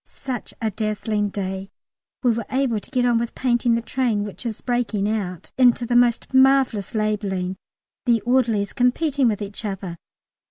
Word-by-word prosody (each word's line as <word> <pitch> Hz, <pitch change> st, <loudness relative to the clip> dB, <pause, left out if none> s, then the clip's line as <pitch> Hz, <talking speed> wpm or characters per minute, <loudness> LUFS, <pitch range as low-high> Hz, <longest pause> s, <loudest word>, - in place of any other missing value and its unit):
Such 255 Hz, -4 st, -6 dB
a 220 Hz, -1 st, -1 dB
dazzling 215 Hz, 0 st, -1 dB
day: 190 Hz, -1 st, -4 dB, 0.5 s
we 245 Hz, -, +4 dB
were 230 Hz, -1 st, -3 dB
able 260 Hz, -4 st, +1 dB
to -, -, -14 dB
get 250 Hz, -2 st, +1 dB
on 240 Hz, -2 st, +3 dB
with 235 Hz, 0 st, -4 dB
painting 240 Hz, -2 st, +2 dB
the 230 Hz, -, -2 dB
train, 235 Hz, -5 st, 0 dB
which 205 Hz, +4 st, -6 dB
is 220 Hz, -, -4 dB
breaking 235 Hz, -5 st, 0 dB
out 195 Hz, -5 st, -3 dB
into 245 Hz, -1 st, +5 dB
the 240 Hz, -, 0 dB
most 240 Hz, +1 st, +3 dB
marvellous 260 Hz, -6 st, +3 dB
labelling, 200 Hz, -4 st, -1 dB, 0.5 s
the 235 Hz, -1 st, +4 dB
orderlies 230 Hz, -4 st, +1 dB
competing 265 Hz, +2 st, +2 dB
with 210 Hz, -2 st, 0 dB
each 205 Hz, +3 st, -7 dB
other. 195 Hz, -4 st, -4 dB
230 Hz, 165 wpm, -23 LUFS, 205-245 Hz, 0.5 s, into